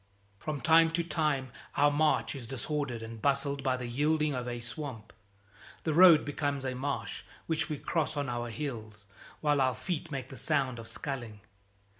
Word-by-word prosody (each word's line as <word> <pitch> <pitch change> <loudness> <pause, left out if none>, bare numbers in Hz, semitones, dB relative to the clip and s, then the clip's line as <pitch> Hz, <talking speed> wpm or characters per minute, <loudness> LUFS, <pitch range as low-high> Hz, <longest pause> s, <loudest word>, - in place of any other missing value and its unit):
From 150 +1 -4
time 165 0 +6
to 170 0 +1
time 150 -6 0 0.3
our 145 +1 +5
march 140 -6 +2
is 130 -4 -7
disordered 135 -1 -3
and 115 -1 -8
bustled 140 +1 +1
by 130 -1 +1
the 125 - -5
yielding 150 +5 +1
of 125 -2 -3
a 120 -1 -3
swamp. 120 -2 -6 0.7
The 160 - 0
road 170 -1 +8
becomes 145 -2 -2
a 130 - -1
marsh 135 +2 -3 0.2
which 160 -2 -1
we 150 - -2
cross 155 0 -1
on 140 -1 -1
our 120 -1 -2
heels, 110 -6 -6 0.4
while 145 -2 +3
our 130 -1 +2
feet 170 -3 -3
make 135 -4 -5
the 135 - -9
sound 130 +1 0
of 115 - -8
sculling. 120 -8 -5
140 Hz, 175 wpm, -31 LUFS, 120-150 Hz, 0.7 s, road